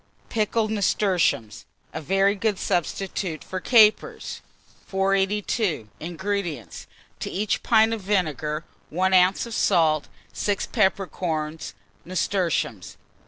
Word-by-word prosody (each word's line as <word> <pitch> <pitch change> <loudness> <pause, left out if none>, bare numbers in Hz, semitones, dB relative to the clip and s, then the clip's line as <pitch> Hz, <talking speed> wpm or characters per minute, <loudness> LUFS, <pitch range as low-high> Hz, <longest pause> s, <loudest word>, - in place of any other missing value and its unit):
PICKLED 215 0 0
NASTURTIUMS 185 - +1 0.3
(a 160 - -4
very 195 +5 +2
good 210 0 -1
Substitute 175 -2 -2
for 185 - -5
Capers) 215 +1 +3 0.5
482. 195 - 0
INGREDIENTS. 175 - -4 0.3
To - - -4
each 205 +2 -1
pint 225 -1 +4
of 225 - -4
vinegar, 155 -6 -1 0.3
1 185 +3 +1
oz. 185 +3 +4
of 235 - -8
salt, 160 -8 +2 0.3
6 205 -1 -1
peppercorns, 175 -6 -1 0.3
nasturtiums. 175 - -1
190 Hz, 100 wpm, -24 LUFS, 160-205 Hz, 0.5 s, pint